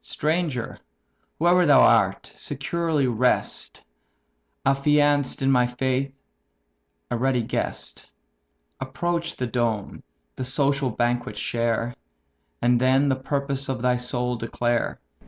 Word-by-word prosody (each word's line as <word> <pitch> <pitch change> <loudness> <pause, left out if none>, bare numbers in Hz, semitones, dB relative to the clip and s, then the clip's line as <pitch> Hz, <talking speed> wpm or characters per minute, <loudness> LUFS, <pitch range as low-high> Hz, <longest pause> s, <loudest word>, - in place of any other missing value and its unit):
"Stranger, 155 -6 -2 0.6
whoe'er 175 +1 +4
thou 140 -2 +7
art, - - +3
securely 150 +1 -1
rest, 125 0 -1 0.8
Affianced 145 0 +2
in 135 - +3
my 125 -2 +4
faith, 130 +2 -1 1.0
a 120 - 0
ready 125 -1 +1
guest; - - -4 0.7
Approach 170 +5 -2
the 125 - -3
dome, 115 -4 -2 0.4
the - - -3
social 135 +1 +1
banquet 120 -2 -1
share, 115 +1 -1 0.7
And 120 0 +4
then 130 +3 +3
the 135 - +2
purpose 140 0 -3
of 130 -2 -3
thy 125 0 +2
soul 125 0 -2
declare." 120 +1 -1
130 Hz, 110 wpm, -24 LUFS, 120-140 Hz, 1.0 s, thou